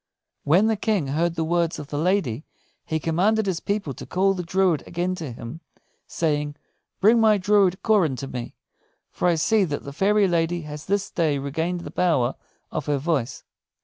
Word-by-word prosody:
When 175 Hz, +8 st, +4 dB
the 220 Hz, 0 st, +2 dB
King 200 Hz, -9 st, 0 dB
heard 165 Hz, +4 st, 0 dB
the 165 Hz, -, -1 dB
words 170 Hz, 0 st, 0 dB
of 145 Hz, -1 st, -8 dB
the 145 Hz, -, -3 dB
lady, 155 Hz, -, 0 dB, 0.4 s
he 160 Hz, -, -1 dB
commanded 195 Hz, +8 st, +1 dB
his 185 Hz, -3 st, -1 dB
people 200 Hz, -8 st, -2 dB
to -, -, -9 dB
call 195 Hz, +1 st, +2 dB
the 185 Hz, -, -4 dB
druid 180 Hz, -2 st, +1 dB
again 175 Hz, +2 st, -1 dB
to 160 Hz, -7 st, -5 dB
him, 120 Hz, +7 st, -8 dB, 0.5 s
saying, 150 Hz, -2 st, -1 dB, 0.4 s
"Bring 225 Hz, +4 st, +5 dB
my 215 Hz, -1 st, +5 dB
druid 195 Hz, -1 st, +2 dB
Coran 190 Hz, -, +3 dB
to 135 Hz, +2 st, -6 dB
me; 125 Hz, -2 st, -6 dB, 0.6 s
for -, -, -1 dB
I 175 Hz, -, +3 dB
see 205 Hz, +6 st, +2 dB
that 145 Hz, -6 st, -3 dB
the 140 Hz, -, -8 dB
fairy 200 Hz, +5 st, +3 dB
lady 170 Hz, 0 st, 0 dB
has 150 Hz, -1 st, -8 dB
this 200 Hz, +1 st, 0 dB
day 155 Hz, -4 st, +1 dB
regained 160 Hz, +6 st, -2 dB
the -, -, -8 dB
power 140 Hz, -9 st, +1 dB, 0.4 s
of 145 Hz, -, -4 dB
her 145 Hz, -1 st, +1 dB
voice." 140 Hz, -4 st, -2 dB
170 Hz, 185 wpm, -24 LUFS, 150-195 Hz, 0.6 s, Bring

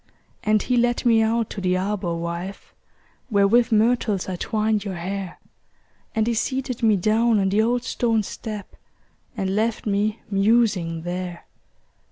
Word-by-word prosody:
And 215 Hz, 0 st, +2 dB
he 250 Hz, -, +1 dB
led 240 Hz, +1 st, +1 dB
me 230 Hz, -2 st, +5 dB
out 225 Hz, 0 st, 0 dB
to 200 Hz, -, -5 dB
the 185 Hz, 0 st, +1 dB
arbor, 185 Hz, -2 st, -2 dB
wife, 170 Hz, +3 st, -6 dB, 0.6 s
Where 200 Hz, -3 st, +4 dB
with 235 Hz, +3 st, +3 dB
myrtles 220 Hz, -3 st, +2 dB
I 185 Hz, -, -3 dB
twined 215 Hz, +2 st, 0 dB
your 195 Hz, -3 st, -4 dB
hair; 190 Hz, +2 st, -5 dB, 0.8 s
And 220 Hz, -1 st, +2 dB
he 235 Hz, -, +1 dB
seated 255 Hz, +1 st, -2 dB
me 220 Hz, -2 st, +4 dB
down 220 Hz, +3 st, +2 dB
on 195 Hz, -1 st, +1 dB
the 205 Hz, +3 st, +3 dB
old 240 Hz, +2 st, +1 dB
stone 225 Hz, -2 st, 0 dB
step, 210 Hz, 0 st, -7 dB, 0.6 s
And 190 Hz, -1 st, -1 dB
left 220 Hz, +1 st, 0 dB
me 210 Hz, +1 st, 0 dB
musing 195 Hz, -5 st, +2 dB
there. 175 Hz, 0 st, -5 dB
210 Hz, 155 wpm, -23 LUFS, 190-230 Hz, 0.8 s, me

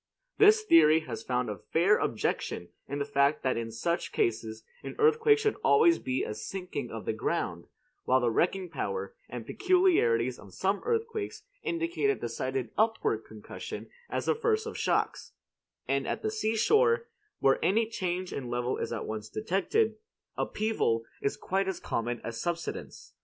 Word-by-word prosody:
This 430 Hz, +1 st, +7 dB
theory 245 Hz, -, +6 dB
has 115 Hz, -7 st, -6 dB
found 125 Hz, +1 st, -1 dB
a 105 Hz, -3 st, -5 dB
fair 185 Hz, +6 st, +3 dB
objection 90 Hz, -5 st, -2 dB, 0.2 s
in 140 Hz, -, -3 dB
the 140 Hz, -, -1 dB
fact 140 Hz, +1 st, +2 dB
that 130 Hz, -, +1 dB
in 115 Hz, -1 st, -3 dB
such 170 Hz, +10 st, -2 dB
cases 110 Hz, -1 st, -1 dB, 0.2 s
an -, -, -7 dB
earthquake 450 Hz, 0 st, +5 dB
should 435 Hz, -1 st, 0 dB
always 165 Hz, +5 st, +5 dB
be 130 Hz, 0 st, -1 dB
a -, -, -3 dB
sinking 145 Hz, -, -5 dB
of 115 Hz, -1 st, -7 dB
the -, -, 0 dB
ground: 110 Hz, -, -2 dB, 0.4 s
while 130 Hz, +1 st, +4 dB
the 120 Hz, -2 st, +1 dB
wrecking 185 Hz, +8 st, +1 dB
power 470 Hz, -, -4 dB, 0.2 s
and -, -, -6 dB
peculiarities 350 Hz, -, +2 dB
of 100 Hz, -3 st, -14 dB
some 195 Hz, +2 st, 0 dB
earthquakes 455 Hz, -2 st, -2 dB, 0.2 s
indicate 335 Hz, +4 st, 0 dB
a 415 Hz, -, +3 dB
decided 130 Hz, +1 st, -3 dB
upward 220 Hz, -, +1 dB
concussion 110 Hz, -1 st, -8 dB, 0.2 s
as -, -, -2 dB
the -, -, +3 dB
first 450 Hz, -1 st, 0 dB
of -, -, -6 dB
shocks; -, -, -1 dB, 0.5 s
and -, -, 0 dB
at -, -, -3 dB
the 430 Hz, -, 0 dB
seashore, 440 Hz, -, +2 dB, 0.3 s
where 135 Hz, -, +3 dB
any 225 Hz, +4 st, +3 dB
change 185 Hz, -4 st, -3 dB
in 125 Hz, -3 st, -4 dB
level 120 Hz, +1 st, -1 dB
is -, -, -3 dB
at 115 Hz, -, -3 dB
once 110 Hz, 0 st, -5 dB
detected, 195 Hz, -, 0 dB, 0.4 s
upheaval 210 Hz, -, 0 dB, 0.2 s
is 140 Hz, -, -1 dB
quite 195 Hz, +1 st, -1 dB
as 190 Hz, -, -2 dB
common 120 Hz, +1 st, -2 dB
as 115 Hz, 0 st, -5 dB
subsidence. 170 Hz, -1 st, -5 dB
170 Hz, 165 wpm, -29 LUFS, -, 0.5 s, This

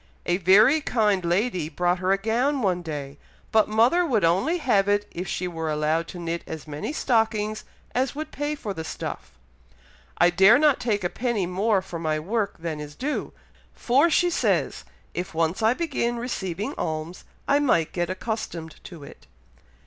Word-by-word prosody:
A 175 Hz, -, +1 dB
very 210 Hz, -, +5 dB
kind 210 Hz, -9 st, +1 dB
lady 175 Hz, -2 st, 0 dB
brought 175 Hz, +1 st, 0 dB
her 185 Hz, +1 st, 0 dB
a 195 Hz, -, +4 dB
gown 240 Hz, +6 st, 0 dB
one 180 Hz, -3 st, +1 dB
day, 145 Hz, -4 st, -6 dB, 0.3 s
but 220 Hz, -1 st, +3 dB
mother 235 Hz, +11 st, +4 dB
would 240 Hz, -, +1 dB
only 195 Hz, -, +2 dB
have 210 Hz, -, +2 dB
it 205 Hz, 0 st, +1 dB
if 180 Hz, +2 st, -5 dB
she 180 Hz, -, -2 dB
were 165 Hz, -2 st, -4 dB
allowed 155 Hz, +2 st, 0 dB
to 180 Hz, -, -9 dB
knit 170 Hz, 0 st, -4 dB
as 160 Hz, -2 st, -7 dB
many 150 Hz, -, -4 dB
stockings 220 Hz, -6 st, 0 dB, 0.3 s
as 255 Hz, +1 st, 0 dB
would 310 Hz, +1 st, -5 dB
pay 290 Hz, +1 st, -2 dB
for 215 Hz, -8 st, -5 dB
the 160 Hz, -, -5 dB
stuff. 65 Hz, -, -7 dB, 0.8 s
I 175 Hz, 0 st, +5 dB
dare 195 Hz, +6 st, +6 dB
not 295 Hz, -1 st, +3 dB
take 210 Hz, -5 st, -1 dB
a -, -, +2 dB
penny 230 Hz, -1 st, -1 dB
more 190 Hz, +2 st, +1 dB
for 175 Hz, -3 st, -7 dB
my 155 Hz, -1 st, -1 dB
work 205 Hz, +6 st, -2 dB
than 165 Hz, -2 st, -4 dB
is 150 Hz, -1 st, -8 dB
due, 295 Hz, +3 st, -3 dB, 0.4 s
for 275 Hz, +7 st, +3 dB
she 350 Hz, +2 st, +2 dB
says, -, -, 0 dB, 0.3 s
if 175 Hz, -1 st, -5 dB
once 165 Hz, +4 st, 0 dB
I 225 Hz, +3 st, +3 dB
begin 240 Hz, -8 st, -1 dB
receiving 210 Hz, -, -3 dB
alms, 160 Hz, +3 st, -4 dB, 0.2 s
I 285 Hz, +1 st, +4 dB
might 170 Hz, -, +2 dB
get 175 Hz, -1 st, -1 dB
accustomed 185 Hz, -5 st, -5 dB
to 165 Hz, -5 st, -10 dB
it." 140 Hz, -, -14 dB
195 Hz, 180 wpm, -25 LUFS, 170-240 Hz, 0.8 s, dare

